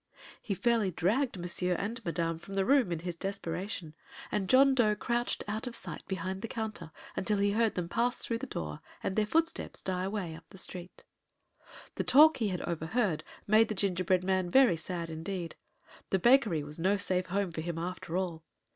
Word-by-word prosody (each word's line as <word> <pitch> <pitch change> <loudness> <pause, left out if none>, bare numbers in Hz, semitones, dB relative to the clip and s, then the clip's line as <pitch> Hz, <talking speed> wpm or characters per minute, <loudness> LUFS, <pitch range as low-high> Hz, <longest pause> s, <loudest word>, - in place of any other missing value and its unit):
He 200 - -2
fairly 230 -1 +2
dragged 205 - 0
Monsieur 180 +1 0
and 210 +7 -4
Madame 165 -1 -1
from 195 +3 -9
the 195 -1 +2
room 265 -6 +4
in 165 -2 -2
his 175 0 -4
desperation, 185 -2 -4 0.4
and 195 -3 -1
John 270 +1 +6
Dough 220 -5 +3
crouched 240 +3 -1
out 215 +4 -3
of 240 - -3
sight - - -4
behind 190 0 -3
the 230 - -3
counter 215 -8 -5 0.2
until 210 +2 0
he 200 0 +2
heard 225 +1 +2
them 180 -2 -2
pass 240 +7 0
through 230 -1 -2
the 270 - -5
door 75 - -5 0.2
and 190 - -1
their 215 -1 +2
footsteps 330 +7 0
die 185 -1 -2
away 195 -4 -3
up 165 +1 -12
the - - -13
street. 180 -1 -7 0.9
The - - 0
talk 310 +3 +7
he 225 - 0
had 185 -3 -2
overheard 170 +1 -1 0.2
made 215 +2 +5
the 215 - -3
gingerbread 185 -2 +1
man 185 -1 +1
very 260 -5 +6
sad 170 0 -4
indeed. 165 +1 -4 0.5
The 190 - +3
bakery 220 - +4
was 150 +2 -7
no 190 +4 +2
safe 185 -1 0
home 195 0 -1
for 160 - -4
him, 170 0 -4
after 175 0 -3
all. 170 -4 -3
190 Hz, 190 wpm, -31 LUFS, 170-220 Hz, 0.9 s, talk